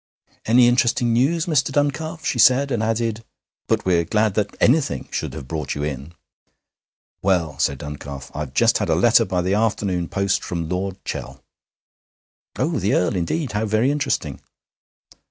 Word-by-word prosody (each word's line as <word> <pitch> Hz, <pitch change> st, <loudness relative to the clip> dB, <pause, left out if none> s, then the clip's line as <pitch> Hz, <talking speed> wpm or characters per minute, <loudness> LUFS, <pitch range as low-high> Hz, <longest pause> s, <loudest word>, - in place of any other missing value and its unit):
'Any 120 Hz, +2 st, +6 dB
interesting 120 Hz, -1 st, +2 dB
news, 150 Hz, +8 st, +2 dB
Mr. 150 Hz, -5 st, +1 dB
Duncalf?' 155 Hz, +3 st, -1 dB
she 120 Hz, -, -1 dB
said, 135 Hz, +4 st, +5 dB
and 120 Hz, -3 st, 0 dB
added: 115 Hz, 0 st, -1 dB, 0.4 s
'But -, -, 0 dB
we're 85 Hz, -2 st, +3 dB
glad 105 Hz, +4 st, +1 dB
that 105 Hz, 0 st, -2 dB
anything 130 Hz, -, +2 dB
should -, -, -3 dB
have 65 Hz, -, -8 dB
brought 80 Hz, 0 st, -4 dB
you 70 Hz, -, -3 dB
in.' 75 Hz, +3 st, -5 dB, 1.1 s
'Well,' 85 Hz, -7 st, 0 dB
said 70 Hz, -2 st, +1 dB
Duncalf, 70 Hz, -1 st, -8 dB
'I've 75 Hz, -3 st, -6 dB
just -, -, +3 dB
had -, -, -2 dB
a -, -, +3 dB
letter -, -, +4 dB
by 90 Hz, -1 st, -1 dB
the 95 Hz, +2 st, 0 dB
afternoon 100 Hz, -5 st, 0 dB
post 100 Hz, +1 st, 0 dB
from 85 Hz, -2 st, -4 dB
Lord 95 Hz, +2 st, -3 dB
Chell.' -, -, -6 dB, 1.1 s
'Oh, -, -, -1 dB
the -, -, +1 dB
Earl! 90 Hz, -, +1 dB
Indeed; 120 Hz, -, -2 dB
how 105 Hz, +1 st, -1 dB
very 110 Hz, +6 st, +2 dB
interesting.' 135 Hz, -, -2 dB
105 Hz, 160 wpm, -21 LUFS, 85-125 Hz, 1.1 s, Any